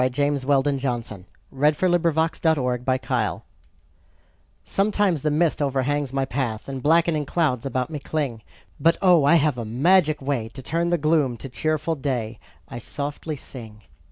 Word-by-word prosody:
James 140 +1 -1
Weldon 140 0 +2
Johnson 115 -7 -4 0.2
The 140 +2 +1
Gift 150 - -3
to 160 -7 +1
Sing 130 0 -1 1.2
SOMETIMES 195 -5 +1
the 150 - +1
mist 155 +1 +1
overhangs 140 0 0
my 135 0 0
path, 125 -5 -3
And 135 -1 -5
blackening 160 0 +2
clouds 140 -7 0
about 130 +2 -2
me 150 - -4
cling; 140 -6 -3 0.4
But, 165 +4 +3
oh, 180 -5 +5
I 165 - +6
have 150 -5 +2
a - - -3
magic 155 - +3
way 135 -5 -2
To 135 - -8
turn 170 +4 -1
the 175 - +2
gloom 150 -5 +1
to 135 - -8
cheerful 155 +4 -1
day 125 -7 -3 0.3
I 120 - -7
softly 145 +5 -5
sing. 110 -6 -11
145 Hz, 155 wpm, -23 LUFS, 130-160 Hz, 1.2 s, I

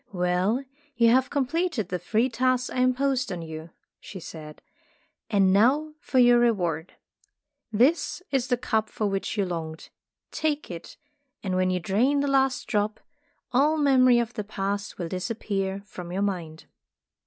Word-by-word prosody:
"Well, 180 +7 +1 0.3
you 235 -1 +5
have 260 +1 +3
completed 285 - -1
the 180 - -2
three 220 +7 +1
tasks 255 +1 0
I - - -5
imposed 255 -1 +1
on 175 -2 -4
you," 160 0 -8 0.3
she 190 - -9
said, 155 -2 -10 0.7
"and 195 -3 +4
now 280 +10 +3
for 265 - -3
your 245 -1 +6
reward. 180 -9 0 0.8
This 275 - +2
is 265 -3 +1
the 250 -2 +1
cup 220 -3 -1
for 215 - -3
which 195 +2 -2
you 200 - +2
longed. 160 -3 -5 0.4
Take 300 -7 -2
it, 170 -1 -9 0.5
and 185 -2 -1
when 185 0 +2
you 185 0 0
drain 235 +11 +2
the 285 - 0
last 270 -1 +2
drop, 210 0 -1 0.5
all 290 +5 +3
memory 260 -4 +5
of 235 0 -1
the 215 - -3
entire 210 +1 -13
Past 200 +1 -2
will 175 - -3
disappear 195 0 -3
from 180 -3 -9
your 195 +3 -1
mind." 170 -6 -4
215 Hz, 160 wpm, -26 LUFS, 185-255 Hz, 0.8 s, your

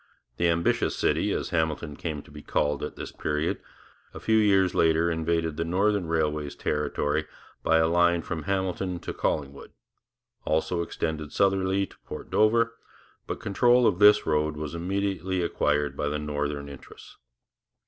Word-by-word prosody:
The 85 - +2
Ambitious 85 0 +1
City, - - +1
as - - -2
Hamilton 80 -2 -1
came 75 -3 -5
to - - -17
be 75 0 -10
called 75 0 0
at 75 - -5
this - - -7
period, 75 +2 -2 0.5
a - - -6
few 110 0 +2
years 95 -3 +3
later 80 +1 +3
invaded 80 -1 -1
the 85 - 0
Northern 95 +2 +1
Railway's 75 -3 -1
territory 75 +1 -1 0.3
by 80 - +3
a 80 - +4
line 85 0 +3
from 80 -3 -5
Hamilton 95 -1 -1
to - - -5
Collingwood, 70 -2 -3 0.7
also 80 +2 0
extended 80 -2 -3
southerly 95 0 +2
to - - -19
Port - - -8
Dover, 115 +2 +3 0.5
but - - -4
control 120 +4 +3
of 90 - +2
this 105 0 +7
road 75 0 0
was 75 0 -5
immediately 95 +1 -1
acquired 75 -3 0
by 75 - -2
the 75 +1 -1
Northern 75 -1 -3
interests. 70 -1 -13
80 Hz, 155 wpm, -27 LUFS, 75-95 Hz, 0.7 s, this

